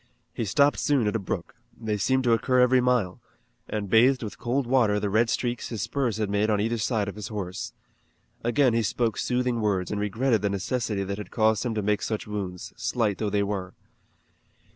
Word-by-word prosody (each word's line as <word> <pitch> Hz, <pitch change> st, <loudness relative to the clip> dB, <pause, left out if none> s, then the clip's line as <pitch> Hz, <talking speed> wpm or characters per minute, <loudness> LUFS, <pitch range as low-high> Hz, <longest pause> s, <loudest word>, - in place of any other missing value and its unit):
He 115 Hz, -, -2 dB
stopped 140 Hz, +8 st, +3 dB
soon 140 Hz, -6 st, +2 dB
at 105 Hz, -, 0 dB
a -, -, +1 dB
brook 95 Hz, -, -4 dB, 0.3 s
they 110 Hz, -2 st, -1 dB
seemed 130 Hz, +6 st, +1 dB
to 120 Hz, -2 st, +3 dB
occur 125 Hz, +3 st, +2 dB
every 125 Hz, 0 st, +5 dB
mile 125 Hz, -8 st, +1 dB, 0.5 s
and 105 Hz, -2 st, -3 dB
bathed 125 Hz, +6 st, +4 dB
with 105 Hz, -, -7 dB
cold 130 Hz, +3 st, 0 dB
water 120 Hz, -5 st, +3 dB
the 105 Hz, -1 st, -2 dB
red 115 Hz, +3 st, +3 dB
streaks 120 Hz, 0 st, -2 dB
his 110 Hz, -5 st, -3 dB
spurs 125 Hz, -7 st, -1 dB
had 110 Hz, -1 st, 0 dB
made 105 Hz, +2 st, +1 dB
on 105 Hz, -1 st, +2 dB
either 115 Hz, +2 st, 0 dB
side 105 Hz, -1 st, 0 dB
of 100 Hz, -, -4 dB
his 105 Hz, +1 st, -6 dB
horse. 95 Hz, -4 st, -5 dB, 0.7 s
Again 120 Hz, +2 st, +3 dB
he 115 Hz, -, +2 dB
spoke 115 Hz, +1 st, 0 dB
soothing 125 Hz, -2 st, 0 dB
words 100 Hz, -4 st, 0 dB
and 105 Hz, -1 st, -2 dB
regretted 110 Hz, +2 st, +1 dB
the 100 Hz, -, +1 dB
necessity 105 Hz, +1 st, -1 dB
that 100 Hz, +1 st, -4 dB
had 105 Hz, -, -7 dB
caused 110 Hz, -2 st, +2 dB
him 115 Hz, -, -2 dB
to 105 Hz, -, -1 dB
make 105 Hz, +1 st, +1 dB
such 110 Hz, -2 st, -3 dB
wounds, 95 Hz, -4 st, -5 dB
slight 110 Hz, -5 st, -1 dB
though 110 Hz, -, 0 dB
they 100 Hz, 0 st, +1 dB
were. 100 Hz, -2 st, -4 dB
110 Hz, 205 wpm, -26 LUFS, 100-120 Hz, 0.7 s, every